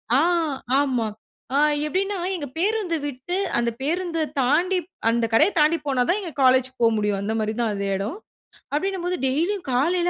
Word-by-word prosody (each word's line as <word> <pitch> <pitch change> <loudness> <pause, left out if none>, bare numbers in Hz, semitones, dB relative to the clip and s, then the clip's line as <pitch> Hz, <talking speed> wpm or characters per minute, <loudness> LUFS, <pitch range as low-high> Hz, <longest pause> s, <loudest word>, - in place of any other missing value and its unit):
ஆ! - - +5 0.6
ஆமா. 255 -6 +1 0.5
ஆ - - +4 0.3
எப்படின்னா 390 +5 -1 0.2
எங்க 300 -5 -5
பேருந்து 390 -2 0
விட்டு 285 +5 -4 0.2
அந்த 235 0 +1
பேருந்த 335 +3 -1 0.2
தாண்டி 340 +9 +2 0.3
அந்த 235 0 +2
கடைய 295 - +5
தாண்டி 310 +3 +4
போனா 270 -3 +1
தான் 365 - +2
எங்க 345 -4 -6
காலேஜ்க்கு 260 0 +3
போக 230 - +6
முடியும். 205 -1 0
அந்த 215 +2 -2
மாரி 215 0 -1
தான் 225 -3 +1
அ 200 - -4 0.2
எடம். 205 - -3 0.6
அப்படின்னும்போது 365 +2 -1
டெய்லியும் 340 +8 0
காலைல 345 +8 +2
295 Hz, 160 wpm, -23 LUFS, 245-360 Hz, 0.6 s, போக